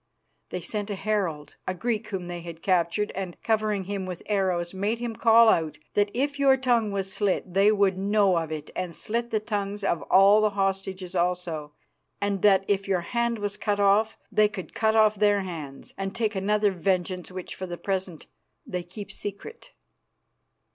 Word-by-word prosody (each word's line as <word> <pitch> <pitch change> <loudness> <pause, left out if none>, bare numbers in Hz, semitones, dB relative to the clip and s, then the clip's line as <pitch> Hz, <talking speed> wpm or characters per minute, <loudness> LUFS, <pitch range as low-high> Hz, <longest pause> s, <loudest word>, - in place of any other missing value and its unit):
They - - -4
sent 210 -1 -4
a 205 - -2
herald, 190 -7 -2
a 185 - -1
Greek 225 +2 -2
whom 190 -4 -4
they 175 0 -6
had 165 -1 -9
captured, 185 +2 +1
and, 185 -2 -5
covering 215 -3 +1
him 195 0 -4
with 180 -2 -6
arrows, 185 -4 0
made 205 +4 -1
him 235 -1 -4
call 230 0 +6
out 160 -7 +2 0.2
that 205 0 +2
if 280 +3 -1
your 270 -1 +5
tongue 240 -4 +2
was 195 -1 -2
slit 195 -3 -1
they 200 +2 +5
would 200 -3 +2
know 200 -2 +3
of 160 -1 -5
it 155 -2 -6
and 175 -3 -4
slit 235 +2 -3
the 220 - +1
tongues 205 -2 -3
of 170 -4 0
all 200 +3 +7
the 215 - +3
hostages 195 -2 -2
also, 175 -4 -1 0.5
and 200 -2 -1
that 195 -2 +5
if 195 -1 0
your 190 -3 +1
hand 235 +5 -1
was 205 -1 -3
cut 205 -1 -1
off 205 +2 +3
they 215 0 +4
could 200 -4 -8
cut 220 0 +1
off 215 -1 +4
their 205 -1 +4
hands, 155 -7 -8
and 195 +1 -3
take 225 -2 0
another 205 +1 +2
vengeance 185 0 -1
which 185 -1 -6
for 185 - -6
the 175 -1 -5
present 190 -4 -3 0.4
they 180 -1 -3
keep 190 +4 -9
secret." 205 - -7
195 Hz, 185 wpm, -26 LUFS, 185-215 Hz, 0.5 s, all